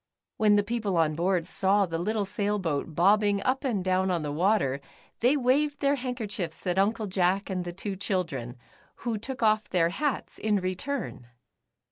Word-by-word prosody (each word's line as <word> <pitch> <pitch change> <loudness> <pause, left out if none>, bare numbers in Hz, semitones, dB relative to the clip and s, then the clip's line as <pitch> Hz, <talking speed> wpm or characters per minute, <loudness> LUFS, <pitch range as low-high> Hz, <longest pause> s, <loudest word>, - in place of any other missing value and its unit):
When 210 -1 +4
the 205 - +3
peo 235 +3 -2
ple 200 -4 0
on 160 -2 +3
board 175 +1 +1
saw 195 +3 +2
the 165 -2 -3
little 210 +3 0
sail 205 +1 -1
boat 160 -4 -2
bobbing 205 +3 +4
up 265 +2 0
and 225 -9 0
down 185 0 +2
on 175 -3 0
the 145 - -3
water, 150 -5 +1 0.4
they 255 +5 +3
waved 285 +3 +2
their 280 0 +2
handker 250 -3 -4
chiefs 185 -6 -5
at 180 +1 +1
Uncle 215 +2 +1
Jack 190 +1 0
and 185 -1 -2
the 175 - -4
two 195 +3 -5
children, 165 - -2 0.5
who 225 -3 -1
took 260 +2 -5
off 215 0 +2
their 170 -2 +2
hats 280 - -2
in 215 -1 +1
return. 185 - -3
200 Hz, 185 wpm, -27 LUFS, 175-220 Hz, 0.5 s, When